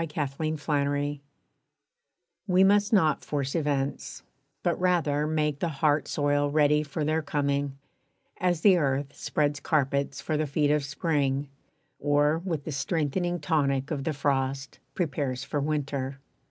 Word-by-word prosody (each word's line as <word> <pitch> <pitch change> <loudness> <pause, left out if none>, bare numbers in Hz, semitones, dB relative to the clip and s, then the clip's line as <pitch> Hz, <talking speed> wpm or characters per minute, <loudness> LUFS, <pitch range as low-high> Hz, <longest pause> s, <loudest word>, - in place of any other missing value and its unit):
=Preparation= 145 -1 -1 1.3
We 185 0 +5
must 205 +2 +4
not 160 -9 +3
force 140 -2 -2
events, 145 -4 -2 0.4
but 175 -2 0
rather 160 -5 +1
make 150 -2 0
The 175 - 0
heart 150 0 +1
soil 145 0 +1
ready 150 0 +3
for 150 +1 -3
their 155 +1 +1
coming, 140 -2 -1 0.6
as 175 -3 0
The 190 -2 +6
earth 140 -2 -1
spreads 145 -1 -1
carpets 140 -1 0
for 155 - -2
the 155 0 0
feet 145 +1 +1
of 150 -1 +2
Spring, 140 -1 -1 0.5
Or, 145 +2 +2
with 165 -5 -3
the 155 - -5
strengthening 165 +4 -1
tonic 140 -4 0
of 140 -3 -2
the 160 - -1
frost, 135 -1 -1 0.2
Prepares 140 -6 -2
for 145 - -2
Winter. 140 -2 -2
145 Hz, 135 wpm, -27 LUFS, 140-155 Hz, 1.3 s, The